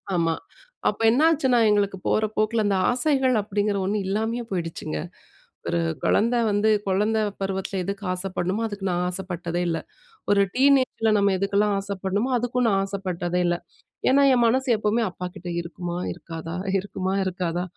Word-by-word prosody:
ஆமா. 165 Hz, -1 st, +2 dB, 0.6 s
அப்ப 205 Hz, -, -5 dB
என்ன 245 Hz, +6 st, +3 dB
ஆச்சுன்னா 265 Hz, -6 st, +3 dB
எங்களுக்கு 200 Hz, -2 st, +1 dB
போற 215 Hz, -, +2 dB
போக்கில, 215 Hz, +1 st, +2 dB
அந்த 200 Hz, -1 st, +2 dB
ஆசைகள் 260 Hz, 0 st, +2 dB
அப்பிடிங்கிற 205 Hz, 0 st, -1 dB
ஒன்னு 205 Hz, +3 st, 0 dB
இல்லாமயே 220 Hz, +4 st, -1 dB
போயிடுச்சுங்க. 165 Hz, -, -3 dB, 0.7 s
ஒரு 85 Hz, -, 0 dB, 0.2 s
குழந்த 235 Hz, +3 st, +3 dB, 0.2 s
வந்து, 205 Hz, +2 st, +2 dB, 0.2 s
குழந்த 210 Hz, +3 st, +1 dB, 0.2 s
பருவத்தில 195 Hz, 0 st, -2 dB
எதுக்கு 200 Hz, +2 st, -4 dB
ஆசைப்பட்ணுமோ, 185 Hz, +2 st, -2 dB
அதுக்கு 205 Hz, -2 st, -6 dB
நான் 175 Hz, 0 st, 0 dB
ஆசைப்பட்டதே 175 Hz, -2 st, -3 dB
இல்ல! 165 Hz, -1 st, 0 dB, 0.5 s
ஒரு 200 Hz, -1 st, +5 dB
டீனேஜ்ல 260 Hz, -4 st, +3 dB
நம்ம 200 Hz, -1 st, +3 dB
எதுக்கெல்லாம் 200 Hz, +2 st, +1 dB
ஆசைப்படணுமோ, 200 Hz, +3 st, -2 dB
அதுக்கும் 245 Hz, +1 st, 0 dB
நான் 195 Hz, -2 st, +2 dB
ஆசைப்பட்டதே 180 Hz, -3 st, -2 dB
இல்ல! 175 Hz, 0 st, +1 dB, 0.5 s
ஏன்னா, 280 Hz, +2 st, +5 dB
என் 245 Hz, -1 st, +3 dB
மனசு 260 Hz, +4 st, +1 dB
எப்பவுமே, 215 Hz, +2 st, +1 dB
"அப்பாக்கிட்ட 180 Hz, 0 st, -7 dB
இருக்குமா? 175 Hz, 0 st, -5 dB, 0.2 s
இருக்காதா? 165 Hz, 0 st, -7 dB, 0.2 s
இருக்குமா? 190 Hz, -1 st, -3 dB
இருக்காதா? 180 Hz, -1 st, -2 dB
200 Hz, 140 wpm, -24 LUFS, 180-220 Hz, 0.7 s, ஒரு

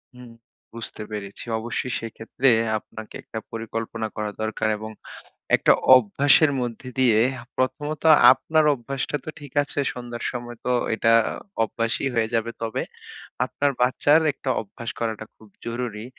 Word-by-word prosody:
হুম 125 Hz, -1 st, -12 dB, 0.4 s
বুঝতে 115 Hz, -1 st, -7 dB
পেরেছি। 100 Hz, -2 st, -6 dB
অবশ্যই 120 Hz, +2 st, -3 dB
সেক্ষেত্রে 115 Hz, +3 st, -1 dB, 0.3 s
আপনাকে 110 Hz, +1 st, -10 dB
একটা 110 Hz, -, -6 dB
পরিকল্পনা 115 Hz, 0 st, -4 dB
করা 105 Hz, -1 st, -3 dB
দরকার, 110 Hz, 0 st, -1 dB
এবং 110 Hz, +1 st, -7 dB, 0.7 s
একটা -, -, +4 dB, 0.2 s
অভ্যাসের 135 Hz, +6 st, +5 dB
মধ্যে 120 Hz, +1 st, -5 dB
দিয়ে 120 Hz, -4 st, +4 dB, 0.4 s
প্রথমত 150 Hz, +4 st, -2 dB, 0.3 s
আপনার 155 Hz, +4 st, +1 dB
অভ্যাসটা 135 Hz, +3 st, -3 dB
তো -, -, -9 dB
ঠিক 145 Hz, -3 st, -11 dB
আছে, 145 Hz, -, -7 dB
সন্ধ্যার 120 Hz, -1 st, -7 dB
সময় 120 Hz, -1 st, -6 dB
তো 125 Hz, -, +1 dB, 0.2 s
এটা 115 Hz, +1 st, +3 dB, 0.5 s
অভ্যাসই 115 Hz, +4 st, -1 dB
হয়ে 110 Hz, 0 st, 0 dB
যাবে। 115 Hz, +1 st, 0 dB
তবে 110 Hz, -1 st, -2 dB, 0.6 s
আপনার 145 Hz, 0 st, 0 dB
বাচ্চার 145 Hz, +5 st, +4 dB
একটা 135 Hz, -, -5 dB
অভ্যাস 115 Hz, +2 st, -8 dB
করাটা 110 Hz, -2 st, -3 dB
খুব 110 Hz, -, -18 dB, 0.2 s
জরুরি। 115 Hz, -2 st, -4 dB
115 Hz, 135 wpm, -24 LUFS, 110-130 Hz, 0.7 s, অভ্যাসের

